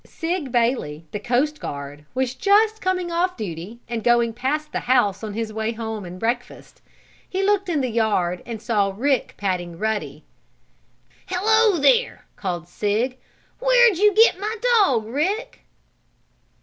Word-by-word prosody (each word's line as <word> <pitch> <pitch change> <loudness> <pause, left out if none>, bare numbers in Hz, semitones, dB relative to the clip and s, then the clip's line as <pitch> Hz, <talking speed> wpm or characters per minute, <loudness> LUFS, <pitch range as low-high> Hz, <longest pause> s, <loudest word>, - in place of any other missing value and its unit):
Sig 330 -5 -4
Bailey, 230 - 0
the 210 - -4
coast 260 +7 0
guard, 145 - -7
was 260 -1 0
just 425 +7 +3
coming 365 -2 -1
off 360 +2 0
duty, 200 +2 -6
and 235 -2 -4
going 235 -1 +3
past 295 +6 -2
the - - -2
house 230 -6 +1
on 215 -2 -5
his 225 -1 -3
way 220 0 -2
to - - -16
home 220 -3 -5
and 180 +1 -9
breakfast. 240 +3 -4 0.5
He 385 +1 -1
looked 400 -1 +1
in 310 -5 +1
the 255 - 0
yard 205 -6 0
and 230 -2 -6
saw 205 -4 0
Rick 270 +1 0
patting 180 -4 -3
Ruddy. 220 +2 -3 1.0
"Hello 420 +2 +3
there!" 470 - +2
called 175 -4 -4
Sig. 220 +8 -1 0.4
"Where'd 485 -6 +4
you 420 +1 +5
get 445 -4 +5
my 425 +3 -2 0.2
dog, 255 - +3
Rick?" 370 - -3
245 Hz, 150 wpm, -22 LUFS, -, 1.0 s, you